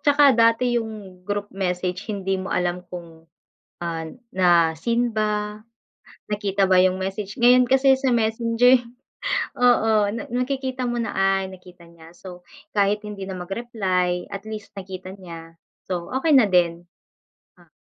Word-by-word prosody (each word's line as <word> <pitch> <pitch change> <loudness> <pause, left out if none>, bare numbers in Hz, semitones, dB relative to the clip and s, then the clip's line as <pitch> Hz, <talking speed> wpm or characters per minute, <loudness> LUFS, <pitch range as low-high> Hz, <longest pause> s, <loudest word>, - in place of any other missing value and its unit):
'tsaka 285 0 +5
dati 235 +1 +3
yung 220 -1 -4 0.4
group 205 0 -3
message 180 -1 -3
hindi 195 -2 -2
mo 190 - -5
alam 180 0 -2
kung, 165 -2 -11 0.6
ah, 165 -1 -3 0.3
na-seen 175 +7 +3
ba, 210 0 -1 0.7
nakita 200 -2 +1
ba 185 - +6
yung 185 0 +1
message, 195 +4 -5
ngayon 250 +1 +6
kasi 265 0 +5
sa 265 0 0
Messenger 235 +2 +3 0.8
oo, 240 -3 +4 0.2
na 225 - -4
nakikita 260 +1 -2
mo 240 - -2
na. 210 - -4
"Ay, 195 0 +1
nakita 180 -1 -15
niya." 165 -1 -16
So 180 -1 -11 0.3
kahit 205 +1 +2
hindi 200 -2 -7
na 190 - -5
mag-reply, 185 -2 -2
at 195 - -7
least, 215 -1 -7
nakita 185 0 -8
niya. 165 -2 -11 0.3
So 175 -2 -3
okey 310 +4 +1
na 245 -5 +6
din. 175 -2 +1 0.7
Ah - - -22
195 Hz, 140 wpm, -23 LUFS, 180-235 Hz, 0.8 s, ba